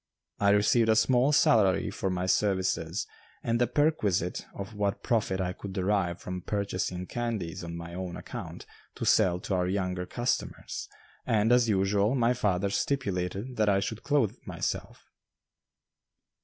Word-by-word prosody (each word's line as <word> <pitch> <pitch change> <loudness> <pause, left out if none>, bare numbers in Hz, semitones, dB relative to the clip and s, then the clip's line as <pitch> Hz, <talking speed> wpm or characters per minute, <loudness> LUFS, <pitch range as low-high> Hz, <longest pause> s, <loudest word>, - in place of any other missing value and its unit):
I 100 - +4
received 105 +3 +4
a 110 - +5
small 125 +5 +4
salary 105 -9 +4
for 95 - -2
my 90 0 -1
services 95 -2 0 0.4
and 115 +1 0
the 120 - +4
perquisite 115 - 0
of 100 +2 -6
what 100 -1 -1
profit 105 -5 0
I 90 -1 -1
could 95 +1 -8
derive 95 -2 0
from 90 0 -5
purchasing 95 -2 -2
candies 110 -9 -3
on 85 0 -6
my 85 0 -8
own 90 -1 -5
account - - -8 0.3
to - - -4
sell 90 -1 +4
to 100 - -3
our 90 -1 +1
younger 90 -1 -2
customers, 120 +1 -3 0.3
and, 110 +1 +2
as 120 -1 +4
usual, 100 +3 +2
my 120 -1 +3
father 100 -5 0
stipulated 100 -2 -2
that 105 -1 +3
I 100 -1 +3
should 110 +3 -4
clothe 140 -8 +1
myself. - - -4
100 Hz, 150 wpm, -29 LUFS, 90-115 Hz, 0.4 s, a